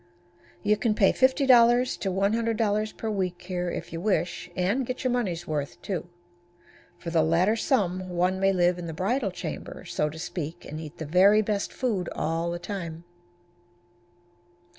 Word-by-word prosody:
You 210 0 +3
can 215 0 +1
pay 195 -3 +4
$50 255 -2 +4
to 195 - -1
$100 215 +2 0
per 225 - -3
week 185 -3 -2
here 180 -1 -3
if 170 -1 -6
you 165 - -4
wish, 185 -3 -1
and 200 +9 +1
get 255 +1 -4
your 255 - +1
money's 185 -9 -1
worth, 145 -2 -3
too. 180 -3 -4 0.9
For 170 - -6
the 165 -1 +3
latter 170 +7 +3
sum 185 -7 0
one 180 +1 +1
may 195 0 +3
live 180 -1 +2
in 170 - -5
the 165 - -5
bridal 205 +6 0
chamber, 180 -3 -7
so 150 - -1
to 155 - -10
speak, 165 0 -5
and 155 - -6
eat 155 -2 -9
the 160 - -5
very 195 +7 +5
best 205 -1 -1
food 210 -9 -1
all 165 +2 -1
the 170 - -2
time. 170 -3 -6
185 Hz, 165 wpm, -27 LUFS, 170-215 Hz, 0.9 s, very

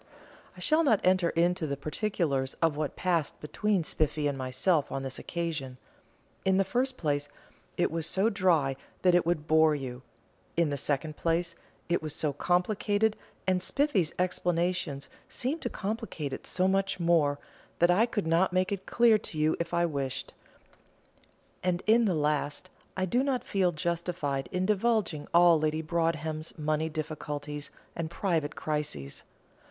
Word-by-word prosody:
I - - -10
shall 315 +1 +3
not 225 -9 +4
enter 185 -2 +4
into 170 -1 +1
the 140 -1 -2
particulars 150 -4 -1
of 165 -3 +2
what 150 -1 -2
passed 170 -4 0
between 195 +4 0
Spiffy 155 -1 0
and 145 -1 +1
myself 135 +5 0
on 135 - -3
this 130 -1 -5
occasion. 155 -7 -4 0.7
In 190 0 +3
the 195 - +4
first 255 +5 -1
place, 145 -2 -1 0.5
it 175 - +2
is 165 -1 -2
so 195 +3 +2
dry 170 -10 +2 0.3
that 180 -1 +5
it 175 -1 +3
would 160 -3 0
bore 160 -1 +5
you; 130 -3 -6 0.6
in 170 -3 +3
the - - 0
second 145 +2 -2
place, 170 +1 0 0.3
it 175 - +1
was 155 -1 -4
so 150 -2 0
complicated, 205 +6 +1 0.3
and 185 -1 +2
Spiffy's 215 - +1
explanations 175 -4 0 0.2
seemed 280 +7 -2
to - - -2
complicate 195 -9 -4
it - - -6
so 185 +1 +1
much 195 0 +1
the 175 - -4
more, 155 -4 +3 0.4
that 175 +1 +5
I 215 +7 +4
could 205 -5 -2
not 165 +4 +3
make 185 +1 +1
it 195 -1 -4
clear 230 -2 +5
to 160 - -7
you 155 +1 +2
if 170 0 -3
I 170 0 +2
wished; 135 -4 -3 1.3
and, 180 -1 0
in 230 +2 +5
the 190 -5 +2
last, 150 +3 -1 0.3
I 185 - +1
do 240 +8 +2
not 270 -2 0
feel 190 -3 +1
justified 165 -4 -2
in 185 0 0
divulging 210 -7 +1
all 170 -1 +6
Lady 155 +1 0
Broadhem's 160 -1 -1
money 155 +1 0
difficulties 150 -2 -5 0.3
and 165 -1 -3
private 165 -4 -1
crises. 150 - -3
170 Hz, 160 wpm, -29 LUFS, 150-185 Hz, 1.3 s, all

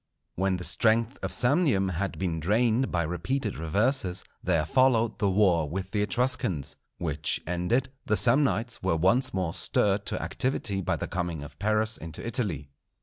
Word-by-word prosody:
When 95 0 0
the 90 - -7
strength 115 +5 +1
of - - -3
Samnium 125 - +2
had 95 +3 -3
been 85 -3 -2
drained 115 +8 +1
by 85 -1 +1
repeated 100 - -2
reverses, 95 - +1 0.2
there 85 -4 +1
followed 115 +3 +2
the 100 - +2
war 90 -6 +3
with 95 +3 -4
the 105 - 0
Etruscans; 105 - 0 0.2
which 75 -3 -1
ended, 90 +10 0 0.2
the 110 - +2
Samnites 125 -2 +2
were 95 -3 +1
once 115 - +2
more 90 -3 -2
stirred 100 0 0
to - - -2
activity 115 -7 -1
by 85 - 0
the - - -4
coming 85 -4 -3
of 75 - -12
Pyrrhus 110 +2 +1
into 80 0 -8
Italy. 100 - -3
100 Hz, 160 wpm, -27 LUFS, 85-115 Hz, 0.2 s, war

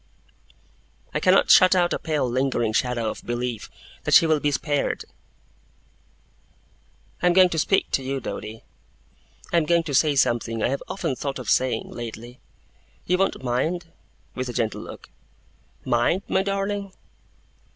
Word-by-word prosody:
I - - 0
cannot - - +4
shut 185 -1 +7
out 175 -1 +2
a - - -2
pale 150 -5 -1
lingering 125 -3 0
shadow 120 -2 0
of - - -10
belief 120 -2 -4 0.3
that - - +3
she - - +7
will 155 -2 +2
be 145 - +1
spared. 145 0 -1 2.2
'I 180 - +3
am 175 - +4
going 185 0 +6
to 165 - -2
speak 195 +5 +1
to - - +1
you, 135 +1 -3
Doady. 110 -1 -7 0.9
I - - +4
am 165 - +2
going 170 +1 +2
to 150 -3 -5
say 145 +2 +3
something 115 -3 +1
I - - +2
have 140 - -2
often 165 -8 -3
thought 140 +1 -4
of 125 -5 -3
saying, 130 0 0
lately. 120 +1 -8 0.7
You 180 +1 +1
won't 195 -7 0
mind?' 165 +8 -2 0.4
with 130 0 -4
a - - -5
gentle 110 -2 -2
look. - - -11 0.8
'Mind, 120 +11 +1
my 190 - +1
darling? 195 0 -3
140 Hz, 155 wpm, -24 LUFS, 120-175 Hz, 2.2 s, shut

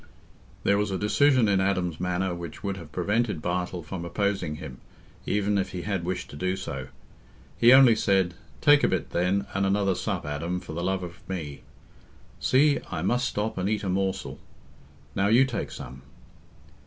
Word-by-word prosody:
There 100 0 +3
was 105 0 0
a 95 - -1
decision 130 +4 +3
in 100 -2 +3
Adam's 90 -4 0
manner 90 0 -1
which 85 +3 -8
would 100 -1 -2
have 85 -5 -10
prevented 105 +3 0
Bartle 90 +1 -2
from 90 -1 -6
opposing 95 -3 -1
him, 70 -4 -9 0.5
even 100 0 +1
if 95 - -3
he 90 -1 -4
had 100 -4 -2
wished 90 0 -4
to - - -9
do 95 +5 -1
so. - - -5 0.7
He 120 - +6
only 130 -3 +8
said, 95 -4 +2 0.3
"Take 145 -1 +6
a - - +5
bit, 95 - -2
then, 90 +3 +1
and 100 - 0
another 100 0 +2
sup, - - -3
Adam, 85 +5 -3
for 80 - -9
the 85 +2 -3
love 95 0 -1
of 85 -1 -8
me. 80 -7 -5 0.8
See, 140 +2 +3
I - - -3
must 125 +1 +1
stop 105 -1 -2
and 95 +2 0
eat 105 -1 -1
a 95 - -2
morsel. 95 0 -2 0.7
Now, 95 - +1
you 120 +5 +5
take 125 -4 -3
some." 65 +2 -9
95 Hz, 180 wpm, -26 LUFS, 90-105 Hz, 0.8 s, only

